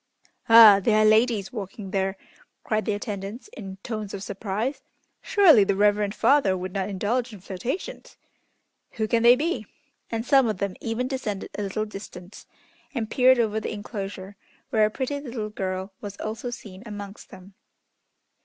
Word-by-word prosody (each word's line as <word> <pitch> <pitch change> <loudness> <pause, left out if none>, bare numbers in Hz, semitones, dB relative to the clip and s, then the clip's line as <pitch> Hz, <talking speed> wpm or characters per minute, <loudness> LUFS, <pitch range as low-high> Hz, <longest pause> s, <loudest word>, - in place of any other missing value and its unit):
"Ah! 225 -3 +10
there 215 +2 +3
are 215 - +4
ladies 215 -2 +3
walking 195 -2 -7
there," 195 0 -1 0.5
cried 215 -1 -1
the 215 - 0
attendants 205 - -6
in 195 - -9
tones 215 -4 -5
of 195 - -7
surprise. 205 +6 -3 0.4
"Surely, 360 - +6
the 200 0 0
Reverend 205 0 +2
Father 270 -10 +3
would 185 0 -6
not 195 0 -2
indulge 230 +6 -1
in 210 - -10
flirtations! 200 - -6 0.8
Who 220 -1 -2
can 230 +1 +2
they 240 +1 +7
be?" 275 -7 -2 0.4
And 225 0 -3
some 270 -1 +5
of 215 -3 -1
them 200 0 -2
even 230 +2 -2
descended 225 -7 -4
a - - -3
little 205 +2 -2
distance, 195 -2 -10 0.5
and 225 -3 -3
peered 260 0 +5
over 220 -2 +1
the - - -5
enclosure, 200 -2 -7 0.3
where 215 -2 +4
a - - -4
pretty 265 +5 -3
little 235 -6 -5
girl 190 -1 -4
was 200 -1 -7
also 220 +3 -5
seen 200 -5 -9
amongst 205 -2 -9
them. 190 +1 -14
215 Hz, 165 wpm, -25 LUFS, 195-235 Hz, 0.8 s, Ah